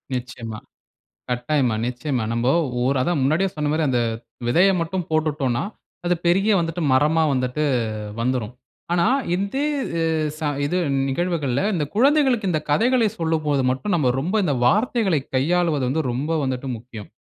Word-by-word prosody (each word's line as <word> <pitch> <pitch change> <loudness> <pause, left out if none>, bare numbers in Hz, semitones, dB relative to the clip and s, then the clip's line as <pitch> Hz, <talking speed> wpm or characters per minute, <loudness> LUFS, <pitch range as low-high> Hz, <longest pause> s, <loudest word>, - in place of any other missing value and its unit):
நிச்சயமா. 120 -3 -6 0.7
கட்டாயமா, 125 -1 0
நிச்சயமா. 125 0 -2
நம்ம 115 +1 -1 0.4
ஒரு 135 +1 +2
அதான் 165 +3 0
முன்னாடியே 160 +8 +2
சொன்ன 150 -1 -1
மாரி 155 +1 +1
அந்த 125 -2 +1 0.5
விதய 175 +11 +4
மட்டும் 170 +1 -3
போட்டுட்டோனா, 150 -6 0 0.4
அது 175 0 +2
பெரிய 195 +5 +3
வந்துட்டு 165 +1 -2
மரமா 150 +4 +3
வந்துட்டு, 130 +3 -1 0.6
வந்துரும். 125 -2 -1 0.4
ஆனா, 175 -1 +2 0.3
இந்தே 200 +10 -1 0.4
எ - - +2 0.3
ச - - -14 0.2
இது 175 +6 0 0.3
நிகழ்வுகள்ல 145 -4 -1
இந்த 165 -5 0
குழந்தைகளுக்கு 260 -4 +3
இந்த 155 - +1
கதைகளை 235 - +3
சொல்லும்போது 155 -4 0
மட்டும், 135 +11 -1
நம்ம 150 -6 +1
ரொம்ப 180 +9 -2
இந்த 155 -6 +1
வார்த்தைகளை, 210 - +2 0.2
கையாளுவது 160 +1 +1
வந்து 155 +5 0
ரொம்ப 135 +6 -2
வந்துட்டு 130 0 -3
முக்கியம். 110 -2 -10
155 Hz, 140 wpm, -22 LUFS, 130-180 Hz, 0.7 s, விதய